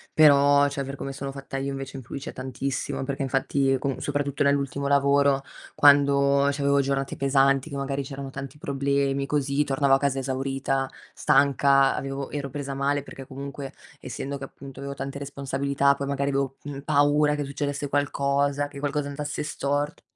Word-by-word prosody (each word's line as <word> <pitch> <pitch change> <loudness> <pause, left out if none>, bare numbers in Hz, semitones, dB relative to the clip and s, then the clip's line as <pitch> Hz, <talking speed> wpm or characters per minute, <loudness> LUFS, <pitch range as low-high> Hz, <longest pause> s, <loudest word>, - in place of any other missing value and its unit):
Però 145 -2 +6
cioè, 140 -1 -3
per 135 +1 -6
come 135 0 -5
sono 135 0 -5
fatta 135 0 -7
io 135 +1 -2
invece 135 0 -6
influisce 135 +2 -7
tantissimo, 130 +1 -3
perché 140 +1 -3
infatti 135 0 +1
con 135 0 -2
soprattutto 145 -1 -1
nell'ultimo 140 0 0
lavoro, 140 0 +3 0.3
quando 140 -1 +5
c'avevo 140 0 +2
giornate 135 0 -1
pesanti 135 +1 +2
che - - -5
magari 140 0 -2
c'erano 135 0 -7
tanti 135 +2 -8
problemi 140 0 0
così, 140 0 +1
tornavo 140 -1 +3
a - - +3
casa 135 -1 0
esaurita, 135 0 -1 0.3
stanca, 140 -1 +4
avevo 135 0 -4
ero 140 -2 -4
presa 140 0 -4
male 140 +1 0
perché 135 -1 -10
comunque, 140 +1 -7 0.3
essendo 140 +1 -5
che 135 - -9
appunto 135 0 -10
avevo 140 0 -4
tante 135 0 -5
responsabilità, 140 0 0
poi 140 - -4
magari 140 0 -1
avevo, 135 -1 -1
mhmm, 140 -1 -6
paura 145 +1 +3
che 145 - -2
succedesse 140 0 -3
qualcosa, 140 0 +1
che 145 - -12
qualcosa 145 0 -1
andasse 145 +1 -4
stort 145 +1 -2
140 Hz, 165 wpm, -25 LUFS, 135-140 Hz, 0.3 s, Però